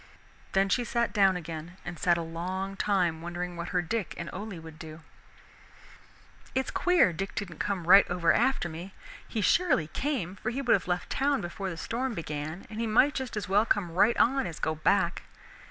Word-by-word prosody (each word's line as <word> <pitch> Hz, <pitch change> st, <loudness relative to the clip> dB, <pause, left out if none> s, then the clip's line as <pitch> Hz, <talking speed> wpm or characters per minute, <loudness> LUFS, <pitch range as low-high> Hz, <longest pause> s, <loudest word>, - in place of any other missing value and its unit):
Then 195 Hz, 0 st, +3 dB
she 245 Hz, +5 st, +1 dB
sat 235 Hz, 0 st, -1 dB
down 195 Hz, -3 st, +4 dB
again 165 Hz, +1 st, -7 dB
and 175 Hz, -2 st, -6 dB
sat 175 Hz, -1 st, +3 dB
a 170 Hz, -, -2 dB
long 185 Hz, +4 st, -4 dB
time 180 Hz, -6 st, +1 dB
wondering 175 Hz, +1 st, -4 dB
what 170 Hz, 0 st, -5 dB
her 180 Hz, -2 st, 0 dB
Dick 215 Hz, +3 st, -3 dB
and -, -, -5 dB
Ole 205 Hz, -1 st, -6 dB
would 160 Hz, -1 st, -12 dB
do. 160 Hz, -1 st, -9 dB, 1.5 s
"It 265 Hz, 0 st, +1 dB
is -, -, -6 dB
queer 355 Hz, -, +3 dB
Dick 195 Hz, +4 st, -5 dB
didn't 175 Hz, -6 st, -5 dB
come 195 Hz, -4 st, -2 dB
right 195 Hz, +3 st, +7 dB
over 175 Hz, -1 st, +2 dB
after 265 Hz, -9 st, +2 dB
me. 170 Hz, +4 st, -8 dB, 0.3 s
He 220 Hz, -, -2 dB
surely 315 Hz, -, +3 dB
came, 200 Hz, -, -2 dB
for 220 Hz, -, -3 dB
he 245 Hz, +4 st, -3 dB
would 260 Hz, -3 st, +3 dB
have -, -, +1 dB
left 180 Hz, 0 st, -2 dB
town 280 Hz, +1 st, +1 dB
before 190 Hz, +3 st, -4 dB
the 170 Hz, -, -6 dB
storm 240 Hz, +7 st, -3 dB
began 155 Hz, +2 st, -5 dB
and 215 Hz, -, -7 dB
he 230 Hz, -, 0 dB
might 255 Hz, +7 st, +4 dB
just 260 Hz, -5 st, -4 dB
as 210 Hz, -, -3 dB
well 200 Hz, +3 st, +4 dB
come 200 Hz, -6 st, 0 dB
right 205 Hz, +7 st, +3 dB
on 265 Hz, +2 st, +3 dB
as 165 Hz, -, -7 dB
go 155 Hz, -, -1 dB
back. 155 Hz, 0 st, +1 dB
190 Hz, 200 wpm, -29 LUFS, 170-225 Hz, 1.5 s, right